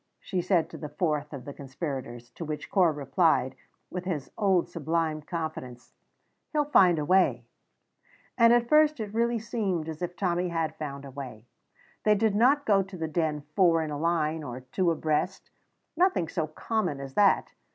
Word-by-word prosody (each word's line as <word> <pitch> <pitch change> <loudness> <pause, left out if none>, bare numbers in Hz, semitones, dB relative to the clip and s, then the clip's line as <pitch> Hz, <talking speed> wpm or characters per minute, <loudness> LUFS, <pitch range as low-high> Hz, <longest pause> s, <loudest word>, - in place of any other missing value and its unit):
she 185 -2 -2
said 175 -2 +2
to - - -10
the 150 - -6
fourth 150 -1 -1
of 135 -4 -8
the 140 - -7
conspirators, 130 -4 -6
to 165 - -8
which 155 -1 -5
Corp 175 -6 +3
replied, 140 -3 +2 0.4
with 180 0 -5
his 155 -7 -3
old 190 -4 +2
sublime 160 -1 -1
confidence, 155 -7 -6 0.6
"He'll 300 -2 +1
find 185 - +5
a 150 - -1
way." 185 +3 +3 0.9
And 230 -1 +6
at 240 0 +4
first 305 0 +4
it 210 -2 -5
really 235 +1 +1
seemed 210 -7 -2
as 160 0 -6
if 175 0 -3
Tommy 180 -1 0
had 165 -2 -2
found 140 -2 -6
a 135 - -9
way. 125 -5 -8 0.6
They 210 0 +4
did 215 0 +2
not 265 +7 +3
go 200 -2 +4
to 195 0 -8
the 160 -1 -2
Den 155 -2 -1
four 170 -4 +4
in 155 - -4
a 145 - -4
line 160 -1 0
or 125 -3 -7
two 170 +8 0
abreast 160 +3 -1 0.4
nothing 355 - +2
so 160 0 -2
common 180 -1 -2
as 135 -1 -7
that. 200 +2 +3
165 Hz, 180 wpm, -28 LUFS, 150-195 Hz, 0.9 s, And